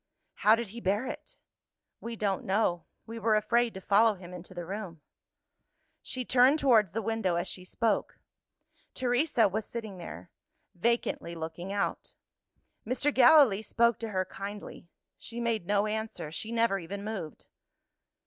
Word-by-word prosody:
"How 215 Hz, +1 st, +5 dB
did 230 Hz, -2 st, -4 dB
he 235 Hz, +4 st, -9 dB
bear 205 Hz, +5 st, 0 dB
it?" -, -, -8 dB, 0.6 s
"We 230 Hz, 0 st, -6 dB
don't 200 Hz, -3 st, -1 dB
know; 190 Hz, -3 st, 0 dB, 0.2 s
we 230 Hz, +1 st, -7 dB
were 220 Hz, 0 st, +2 dB
afraid 230 Hz, +2 st, +2 dB
to 190 Hz, -, -7 dB
follow 215 Hz, +2 st, +4 dB
him 180 Hz, -1 st, -11 dB
into 180 Hz, +1 st, -10 dB
the 175 Hz, -1 st, -5 dB
room." 185 Hz, -4 st, -6 dB, 1.0 s
She 255 Hz, -1 st, -3 dB
turned 255 Hz, +5 st, +5 dB
towards 225 Hz, -, +4 dB
the 225 Hz, +1 st, -2 dB
window 220 Hz, -5 st, 0 dB
as 170 Hz, -, -1 dB
she 180 Hz, -, -6 dB
spoke. 215 Hz, +3 st, -1 dB, 0.8 s
Teresa 245 Hz, -2 st, +2 dB
was 215 Hz, +3 st, -2 dB
sitting 215 Hz, -4 st, -7 dB
there 90 Hz, -, -9 dB, 0.4 s
vacantly 180 Hz, -4 st, -1 dB
looking 165 Hz, +3 st, -6 dB
out. 200 Hz, -, -3 dB, 0.7 s
Mr. 260 Hz, +5 st, 0 dB
Gallilee 260 Hz, -5 st, +6 dB
spoke 235 Hz, +1 st, +2 dB
to 225 Hz, -, -4 dB
her 185 Hz, -2 st, -1 dB
kindly: 200 Hz, -1 st, -8 dB, 0.3 s
she 235 Hz, -, -6 dB
made 230 Hz, -6 st, -1 dB
no 205 Hz, 0 st, +2 dB
answer; 215 Hz, -7 st, -4 dB
she 220 Hz, +7 st, -4 dB
never 230 Hz, -4 st, +2 dB
even 200 Hz, +4 st, -6 dB
moved. 200 Hz, -8 st, -6 dB
215 Hz, 150 wpm, -29 LUFS, 190-235 Hz, 1.0 s, Gallilee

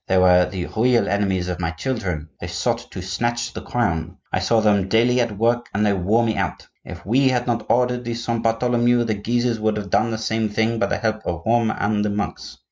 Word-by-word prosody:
They 95 Hz, -, +2 dB
were 90 Hz, -1 st, +5 dB
the 90 Hz, -3 st, -4 dB
real 120 Hz, +1 st, +3 dB
enemies 95 Hz, -3 st, 0 dB
of 90 Hz, -1 st, -3 dB
my 85 Hz, -2 st, -1 dB
children; 90 Hz, -, -3 dB
they -, -, -6 dB
sought -, -, -2 dB
to 90 Hz, -, -7 dB
snatch 120 Hz, +6 st, -2 dB
the -, -, -6 dB
crown; 90 Hz, -7 st, -2 dB, 0.2 s
I -, -, +2 dB
saw 105 Hz, +5 st, +2 dB
them 105 Hz, -3 st, +2 dB
daily 120 Hz, +4 st, +3 dB
at 115 Hz, -4 st, -2 dB
work 120 Hz, +2 st, +1 dB
and 105 Hz, +1 st, +2 dB
they 100 Hz, -, +3 dB
wore 100 Hz, +5 st, +2 dB
me 110 Hz, -2 st, -1 dB
out. 95 Hz, -5 st, -3 dB, 0.2 s
If -, -, -10 dB
we 130 Hz, +7 st, +3 dB
had 125 Hz, -1 st, 0 dB
not 115 Hz, -3 st, -2 dB
ordered 125 Hz, 0 st, +2 dB
the 120 Hz, 0 st, -3 dB
Saint 115 Hz, 0 st, -2 dB
Bartholomew, 120 Hz, +1 st, +2 dB
the 115 Hz, -2 st, -1 dB
Guises 120 Hz, +3 st, -1 dB
would 110 Hz, 0 st, 0 dB
have 100 Hz, -2 st, -6 dB
done 110 Hz, -, +2 dB
the 110 Hz, -, -2 dB
same 110 Hz, 0 st, -1 dB
thing 110 Hz, +2 st, 0 dB
by -, -, +2 dB
the -, -, -1 dB
help 110 Hz, -1 st, -1 dB
of 85 Hz, -1 st, -4 dB
Rome 115 Hz, 0 st, +2 dB
and 105 Hz, 0 st, 0 dB
the 105 Hz, -, 0 dB
monks. 100 Hz, 0 st, -4 dB
110 Hz, 230 wpm, -22 LUFS, 95-120 Hz, 0.2 s, were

